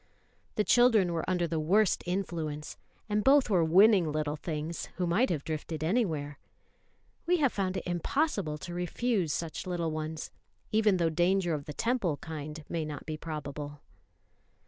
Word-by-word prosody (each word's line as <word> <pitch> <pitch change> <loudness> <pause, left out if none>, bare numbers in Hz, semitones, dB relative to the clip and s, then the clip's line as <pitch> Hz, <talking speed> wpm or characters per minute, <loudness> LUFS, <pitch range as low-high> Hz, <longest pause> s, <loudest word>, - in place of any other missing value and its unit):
The 210 - +2
children 220 -7 +4
were 165 +1 -2
under 180 -2 +1
the 165 -1 -1
worst 190 +5 +3
influence; 165 -5 -3 0.3
and 210 -1 0
both 270 -2 +5
were 180 -4 +4
winning 185 0 +5
little 150 -1 -1
things, 155 +1 -4
who 180 - -1
might 190 +10 +2
have 155 -5 -1
drifted 155 0 -4
anywhere. 160 - 0 0.9
We 360 +1 +4
have 280 -6 +2
found 190 -1 -1
it - - -4
impossible 175 - -1
to 175 +3 -7
refuse 180 0 0
such 165 +3 -4
little 170 -3 -1
ones, 155 0 -4 0.4
even 215 -3 +3
though 165 -2 +1
danger 175 +1 +2
of 145 -2 -3
the 150 - -6
Temple 215 - 0
kind 155 0 -7
may 165 -2 -2
not 150 -2 -6
be 155 - -4
probable. 145 -2 -6
170 Hz, 160 wpm, -30 LUFS, 155-200 Hz, 0.9 s, both